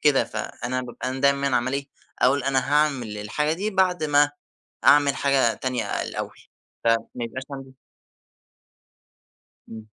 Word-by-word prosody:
كده 145 -3 +4
فأنا 125 +2 -4
بابقى 125 +1 -6
أنا 130 +1 -4
دايمًا 140 -1 +3
عمّال 125 +2 -1
إيه، 140 0 -3 0.3
أقول 130 +1 +3
أنا 135 -1 +2
هاعمل 135 -8 +1
الحاجة 150 +9 -1
دي 200 +6 -2
بعد 185 -4 +1
ما 145 0 +4 0.5
أعمل 145 -1 +6
حاجة 135 -5 +2
تانية 125 -1 -2 0.2
الأول، - - -6 0.5
فما 115 0 +4 0.3
يبقاش 130 +3 -6
عندي 135 -1 -8 2.0
إمم. 110 -1 -9
135 Hz, 130 wpm, -24 LUFS, 125-145 Hz, 2.0 s, أعمل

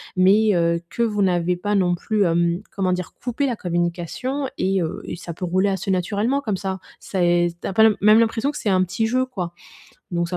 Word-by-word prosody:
mais 200 +4 +4
heu, 170 0 +2
que - - -3
vous 210 -3 +1
n'avez 180 -1 +1
pas 205 +4 -2
non 180 -3 +2
plus, 210 +3 0
hem, 170 +1 +1
comment 185 -2 +1
dire? 180 -1 -4
Coupé 255 +3 -1
la 245 - -1
communication 175 - -2
et 190 -1 +1
heu, 165 +2 -4
et - - -5
ça 170 -1 -7
peut 180 - -5
rouler 185 +3 +1
assez 190 0 -3
naturellement 205 +8 0
comme 215 -8 -2
ça. 190 0 -4 0.2
C'est 175 -2 +1
tu - - -5
as - - -3
pas 220 - +5
l 220 -2 +4
même 215 +2 +6
l'impression 230 +4 +1
que 295 - -7
c'est 210 - -1
un 185 -1 +3
petit 220 +5 -1
jeu 255 +3 +1
quoi, 190 -10 -5 0.6
donc 170 0 0
ça 180 - -3
190 Hz, 225 wpm, -22 LUFS, 175-220 Hz, 0.6 s, même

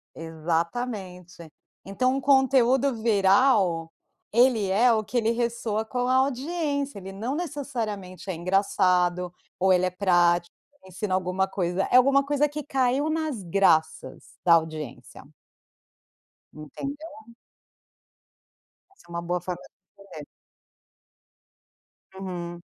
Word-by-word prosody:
Exatamente. 170 +2 -4 0.4
Então, 255 +7 0
um 275 - -2
conteúdo 265 -1 +3
viral 195 -5 +3 0.4
ele 235 -3 +3
é 230 +6 +4
o 220 -1 +1
que 250 - -12
ele 225 -1 +2
ressoa 230 -2 -2
com 245 +2 -2
a 255 - +2
audiência. 280 0 -1
Ele 195 0 -8
não 225 +8 -4
necessariamente 230 - -5
é - - -1
engraçado 180 0 +1 0.3
ou 190 +1 +3
ele 185 0 +3
é - - +1
prático, 175 -2 +2 0.3
ensina 185 +1 -4
alguma 185 +1 0
coisa. 185 -1 -1
É 250 - +7
alguma 275 +2 +4
coisa 290 +1 +1
que 300 +1 -6
caiu 270 +2 0
nas 310 -10 -2
graças 165 -3 0
da 170 - +5
audiência. 155 -4 -2 1.3
Entendeu? 280 - -9 1.6
Essa 390 - -24
é - - -23
uma 170 0 -4
boa 175 +1 -2
forma 180 0 -5
de 195 +1 -20
se 185 -5 -11
vê. 150 - -8 2.0
Uhum. 175 -2 -6
200 Hz, 120 wpm, -25 LUFS, 180-260 Hz, 2.0 s, É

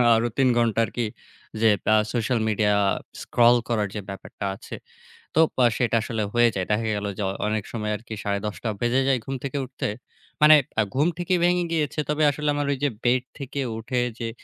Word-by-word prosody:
আরও 115 +1 +1
৩ 135 -2 +4
ঘণ্টা 115 -2 +2
আরকি 120 +1 -3 0.6
যে 115 - +6 0.3
আ - - +5 0.2
social 120 0 0
media 105 -1 +2 0.5
scroll 120 0 +4
করার 110 -3 +1
যে 105 - -3
ব্যাপারটা 100 +1 -7
আছে - - -9 0.6
তো - - +4 0.2
আ - - +6
সেটা 120 -2 +1
আসলে 115 -2 -2
হয়ে 120 0 +5
যায়। 95 -1 -1
দেখা 110 +2 +1
গেল 105 0 -3
যে - - -3
অ - - -1 0.2
অনেক 105 -1 -1
সময় 105 -2 -3
আরকি 110 +1 -9
১০ঃ৩০ 105 +2 -3
বেজে 120 +2 +2
যায় 135 -2 +3
ঘুম 135 - -3
থেকে 140 +1 -3
উঠতে। 130 +1 -4 0.5
মানে 155 +1 +9 0.2
আ - - +6
ঘুম 145 +4 +3
থেকেই 180 0 0
ভেঙে 175 0 +3
গিয়েছে 155 -2 -1
তবে 150 +1 +1
আসলে 150 +1 -2
আমার 145 -1 -1
ওই 140 - -1
যে 145 - +3
bed 125 +1 +2 0.2
থেকে 140 0 -5 0.2
উঠে 120 +3 -2 0.2
যে 115 -1 -3
120 Hz, 195 wpm, -24 LUFS, 110-140 Hz, 0.6 s, মানে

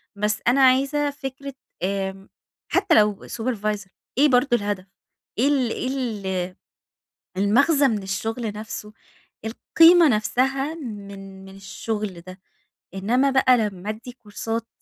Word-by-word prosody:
بس 210 +1 0
أنا 265 +3 +4
عايزة 275 +3 +3
فكرة 275 -1 -7 0.3
آآ، 195 0 -3 0.4
حتى 370 -3 +3
لو 210 -2 +2
supervisor 215 -4 -3 0.3
إيه 295 +2 +6
برضه 250 +3 +3
الهدف؟ 205 -2 -3 0.5
إيه 270 - +4
ال 260 -5 +1
إيه 255 - -3
ال 195 -9 -3 0.8
المغزى 275 - +4
من 210 -4 -1
الشغل 220 +3 -3
نفسُه، 210 0 -7 0.5
القيمة 330 +8 +5
نفسها 270 +6 0
من 200 -8 -9
من 195 0 -12
الشغل 200 -1 -5
ده، 185 +2 -12 0.6
إنمَّا 245 +8 +2
بقى 260 -2 +5
لما 205 -2 -3
أدّي 225 +3 -6
كورسات 225 0 -5
225 Hz, 120 wpm, -23 LUFS, 200-270 Hz, 0.8 s, إيه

